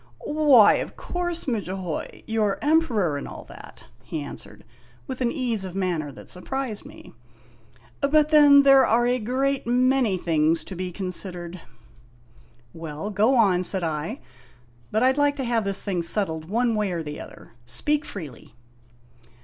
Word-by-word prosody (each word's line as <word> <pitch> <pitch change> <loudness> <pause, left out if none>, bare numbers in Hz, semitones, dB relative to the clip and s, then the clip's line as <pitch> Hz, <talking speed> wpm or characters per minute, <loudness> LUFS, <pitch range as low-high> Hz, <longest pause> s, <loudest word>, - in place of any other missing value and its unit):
"Why, 295 -7 +5
of - - -5
course, 350 -7 -3
Mudjahoy, 190 - -4
you 225 0 -1
're 205 -2 +1
Emperor, 245 - +2
and 140 - -6
all - - -9
that," - - -13 0.2
he 160 - -5
answered, 145 - -10 0.4
with 260 -1 -6
an 240 -1 +1
ease 240 -8 -1
of 185 -1 -7
manner 175 -6 -2
that - - -13
surprised 235 +3 -5
me; - - -14 0.9
"but 300 +1 +3
then 290 -2 +7
there 275 -1 +7
are 240 0 +3
a 250 +1 +1
great 265 +4 -1
many 250 -4 +2
things 160 -1 +1
to 190 - -8
be 180 0 -4
considered." 180 -1 -4 1.1
"Well, 160 +4 -6
go 215 +6 +3
on," 195 -7 +3
said 185 0 +1
I; 165 - -3 0.7
"but 220 +3 +1
I 260 - +5
'd 275 - -3
like 290 0 +3
to 275 - -4
have 235 -3 0
this 200 0 0
thing 185 -4 -1
settled 165 -3 -1
one 230 +6 0
way 210 -3 -1
or 165 -1 -3
the 150 -1 -7
other. - - -13
Speak 295 - -1
freely." 145 - -9
210 Hz, 160 wpm, -24 LUFS, 180-265 Hz, 1.1 s, then